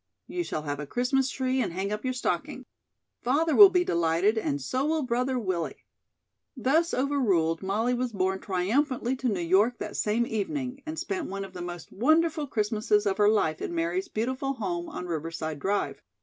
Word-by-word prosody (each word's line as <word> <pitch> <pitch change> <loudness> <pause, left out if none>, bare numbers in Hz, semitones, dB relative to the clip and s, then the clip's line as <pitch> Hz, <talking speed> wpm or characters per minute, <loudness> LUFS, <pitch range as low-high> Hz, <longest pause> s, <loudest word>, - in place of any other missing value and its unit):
You 355 - -3
shall 155 - -4
have 145 -1 -3
a 150 - -5
Christmas 260 - +1
tree 260 0 0
and 170 - -2
hang 195 +3 -2
up 210 0 -3
your 255 -1 -1
stocking. 250 - -2 0.6
Father 295 +5 +2
will 405 -2 +11
be 360 -1 +2
delighted 170 - +2
and 145 -10 -1
so 255 - -1
will 310 +1 +1
Brother 250 +1 0
Willie." 185 -7 -3 0.7
Thus 315 +8 +2
overruled, 210 - +1
Molly 215 +6 0
was 250 0 -1
borne 190 -2 0
triumphantly 240 +8 0
to 255 -1 0
New 200 -4 -1
York 195 +8 +3
that - - -6
same 220 +3 +1
evening, 255 +5 -3
and 315 +1 -4
spent 370 -2 -3
one 195 +1 -4
of 190 - -13
the 180 - -7
most 175 -1 -7
wonderful 315 - +2
Christmases 215 -2 +1
of 200 0 0
her 205 0 +6
life 160 -8 +1
in 345 - -3
Mary's 350 +3 -1
beautiful 260 +2 -2
home 180 -8 -3
on 180 - -6
Riverside 160 -2 -4
Drive. 200 +7 -1
225 Hz, 185 wpm, -27 LUFS, 185-270 Hz, 0.7 s, will